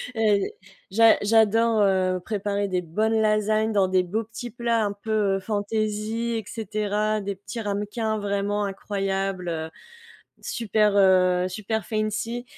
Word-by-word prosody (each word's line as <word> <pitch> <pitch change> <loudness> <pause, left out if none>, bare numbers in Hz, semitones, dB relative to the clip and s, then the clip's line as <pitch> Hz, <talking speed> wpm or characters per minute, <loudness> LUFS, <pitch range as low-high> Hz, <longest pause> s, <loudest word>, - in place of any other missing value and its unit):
Heu, 215 -2 +3 0.5
j'a 225 +3 +5
j'adore, 225 +1 +3
heu, 185 -2 +2
préparer 205 -1 -2
des 180 -1 0
bonnes 215 +7 0
lasagnes 215 +1 +1
dans 195 -2 +3
des 185 -1 +3
beaux 210 +6 -2
petits 230 +2 -8
plats 235 -1 0
un 205 - -2
peu, 210 +2 -7 0.3
heu, - - -4
fantaisie 215 +2 -2
et 220 - -4
cetera, 215 0 -1
des 200 -1 -4
petits 195 +4 -8
ramequins 210 +1 -2
vraiment 205 0 -1
incroyables, 195 -2 -2
heu, 160 -1 -3 0.7
super, 215 -3 +1
heu, 185 -1 +4
super 215 +3 -3
fancy 220 +2 -2
210 Hz, 140 wpm, -24 LUFS, 195-220 Hz, 0.7 s, j'a